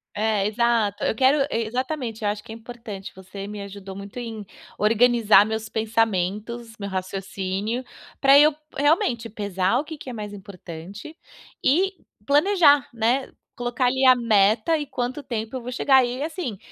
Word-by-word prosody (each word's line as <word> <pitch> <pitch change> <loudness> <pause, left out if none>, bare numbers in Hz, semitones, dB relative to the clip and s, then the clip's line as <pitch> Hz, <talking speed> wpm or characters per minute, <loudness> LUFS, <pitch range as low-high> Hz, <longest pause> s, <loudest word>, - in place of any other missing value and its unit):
É, 210 -1 +1
exato. 225 -2 +1
Eu - - +1
quero 270 +4 +4
e 230 0 0
exatamente. 250 -2 -3
Eu 205 - +2
acho 205 0 -4
que - - -11
é - - -6
importante, 230 -4 -9
você 190 +1 -9
me 210 0 -7
ajudou 200 -1 -9
muito 200 +3 -9
em 225 -3 -6 0.3
organizar 220 -1 +5
meus 220 0 -4
pensamentos, 225 +1 -1
meu 200 -1 -4
raciocínio, 195 +4 -3 0.4
pra 275 0 +7
eu 300 +1 +6 0.2
realmente 250 -6 +1
pesar 200 0 0
o - - -2
que 315 +1 -8
que 275 - -9
é - - -6
mais 210 -2 -6
importante 195 - -10 0.5
e 375 +8 +3 0.3
planejar, 290 -2 +4
né, 240 +4 0 0.2
colocar 245 +1 -1
ali 260 +2 +2
a 255 0 +8
meta 220 +5 +3
em 295 - -4
quanto 260 0 -4
tempo 225 -3 -5
eu 255 - -4
vou 245 +1 -6
chegar. 265 +1 +4
E, 250 +3 -4
assim, 315 - -4
225 Hz, 165 wpm, -24 LUFS, 205-255 Hz, 0.5 s, a